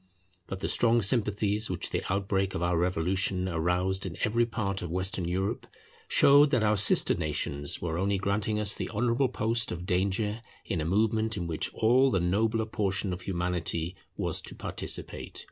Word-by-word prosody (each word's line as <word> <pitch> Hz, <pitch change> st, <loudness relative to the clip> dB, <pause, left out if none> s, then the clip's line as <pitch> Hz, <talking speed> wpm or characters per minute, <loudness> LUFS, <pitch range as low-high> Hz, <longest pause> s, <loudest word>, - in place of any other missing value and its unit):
But 95 Hz, 0 st, -6 dB
the -, -, -1 dB
strong 115 Hz, -1 st, +3 dB
sympathies 105 Hz, -1 st, +2 dB
which -, -, -3 dB
the -, -, -1 dB
outbreak 95 Hz, 0 st, -1 dB
of 85 Hz, -, -2 dB
our 85 Hz, 0 st, +1 dB
revolution 90 Hz, +2 st, 0 dB
aroused 90 Hz, +3 st, 0 dB
in 90 Hz, -4 st, -5 dB
every 115 Hz, +2 st, +2 dB
part 100 Hz, -4 st, -2 dB
of 90 Hz, -, -5 dB
Western 95 Hz, +1 st, -1 dB
Europe, 95 Hz, +3 st, -2 dB, 0.4 s
showed 145 Hz, +1 st, +6 dB
that 125 Hz, -6 st, +2 dB
our 105 Hz, 0 st, +3 dB
sister 100 Hz, -, +4 dB
nations 75 Hz, -2 st, -2 dB
were 85 Hz, -1 st, -2 dB
only 100 Hz, +1 st, +1 dB
granting 100 Hz, +2 st, -1 dB
us 105 Hz, -1 st, +2 dB
the -, -, -5 dB
honourable 120 Hz, +4 st, +1 dB
post 115 Hz, -1 st, 0 dB
of 90 Hz, +1 st, -5 dB
danger 100 Hz, +4 st, 0 dB, 0.2 s
in 90 Hz, -7 st, -2 dB
a -, -, -2 dB
movement 110 Hz, +4 st, +1 dB
in 90 Hz, -, -3 dB
which 80 Hz, -2 st, -2 dB
all 125 Hz, +4 st, +4 dB
the 95 Hz, -, +1 dB
nobler 110 Hz, +6 st, +1 dB
portion 100 Hz, -3 st, -1 dB
of 90 Hz, -, -6 dB
Humanity 90 Hz, -2 st, -2 dB, 0.2 s
was -, -, -2 dB
to -, -, -8 dB
participate. -, -, -4 dB
100 Hz, 175 wpm, -28 LUFS, 90-110 Hz, 0.4 s, showed